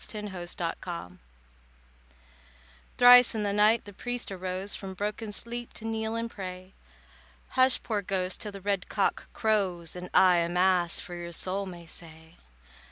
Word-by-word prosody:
THE 215 - -5
PRIEST'S 180 -3 -5
BROTHER 170 - -5 1.8
Thrice 245 -1 +8
in 215 - -1
the 200 -1 0
night 210 +2 +4
the 205 - -10
priest 245 +2 -4
arose 185 +1 -4
From 190 -1 -5
broken 210 +2 -3
sleep 235 +3 -5
to 220 - -9
kneel 220 0 -2
and 230 0 -1
pray. 185 -1 -8 0.8
"Hush, 260 0 +3
poor 215 -3 -1
ghost, 185 -1 -2
till 210 - -5
the 200 -1 -9
red 200 -2 -1
cock 200 - -1
crows, 190 -7 0
And 180 0 -7
I 185 -2 +6
a 170 0 +1
Mass 180 -1 +2
for 175 - -7
your 175 0 -6
soul 195 +4 -2
may 175 -2 -9
say." 160 0 -12
190 Hz, 160 wpm, -28 LUFS, 180-215 Hz, 1.8 s, Thrice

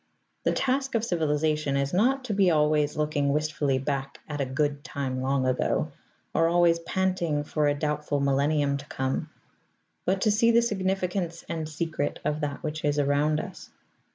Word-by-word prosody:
The - - +4
task 270 0 0
of 230 0 +1
civilization 155 -5 0
is 140 +2 -1
not 255 +8 +2
to 220 - -2
be 195 -2 +4
always 150 -2 +2
looking 150 -2 +1
wistfully 150 -2 0
back 135 0 -3
at 150 -1 -3
a 135 - -1
Good 145 +2 -1
Time 130 -4 -3
long 135 0 +1
ago, 130 +4 0 0.4
or 165 - +3
always 170 0 +4
panting 170 -4 0
for 150 0 0
a 145 - +2
doubtful 150 -1 -1
millennium 140 +1 +2
to 140 - -9
come; 130 +4 -2 0.7
but 190 +1 +1
to 215 - +3
see 230 +3 +4
the 235 0 +5
significance 190 -4 -1
and 160 -2 -3
secret 155 -2 -2
of 150 +1 0
that 145 -1 -3
which 155 -1 -4
is 145 0 +1
around 145 +2 +2
us. - - -8
150 Hz, 170 wpm, -27 LUFS, 145-175 Hz, 0.7 s, the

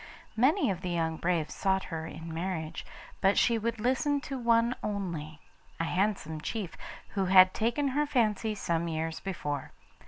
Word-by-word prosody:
Many 260 - +3
of 180 -1 -4
the 180 - -3
young 165 -2 0
braves 170 -3 0
sought 190 -1 +1
her 160 -2 -5
in 165 +1 -8
marriage, 165 -2 -4 0.3
but 195 +1 +4
she 230 -2 +4
would 230 +1 -2
listen 265 +5 +1
to 280 -1 -5
one 235 -1 +3
only 170 -7 -4 0.4
a - - +1
handsome 175 -3 -1
chief, 200 0 -4 0.3
who 195 -2 -1
had 185 0 +7
taken 240 +6 +1
her 295 +3 +1
fancy 220 -5 +1
some 170 -4 -1
years 160 0 -2
before. 150 -7 -4
190 Hz, 160 wpm, -30 LUFS, 165-230 Hz, 0.4 s, had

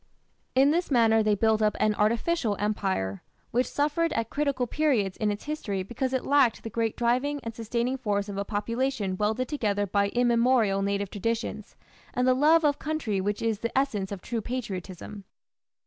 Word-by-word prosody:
In 270 +2 +5
this 345 +3 0
manner 225 -4 +4
they 215 -1 +2
built 220 +1 +2
up 215 -1 +2
an 215 - +3
artificial 225 - +1
empire, 190 - -1 0.3
which 250 +2 +1
suffered 305 +3 0
at 230 0 -2
critical 280 -4 0
periods 245 -9 +1
in 215 - 0
its 205 0 -3
history 210 -11 -3
because 245 +6 -3
it 260 -1 -1
lacked 275 -5 +3
the 225 - -6
great 225 0 -1
driving 255 +5 +1
and 230 - -5
sustaining 235 +3 -2
force 205 -4 -1
of 200 - -6
a 200 - -1
population 220 -1 -2
welded 215 +6 0
together 205 -8 0
by 200 +1 +1
immemorial 235 -3 +2
native 200 0 -1
traditions 215 0 -3 0.4
and 250 +1 +2
the 255 - +6
love 310 +5 +4
of 290 -1 +2
country 265 -11 -2
which 205 +3 -2
is 225 -3 0
the 230 +3 -3
essence 215 -9 0
of 195 -3 -6
true 230 -2 -3
patriotism. 205 -4 -6
225 Hz, 180 wpm, -27 LUFS, 205-260 Hz, 0.4 s, the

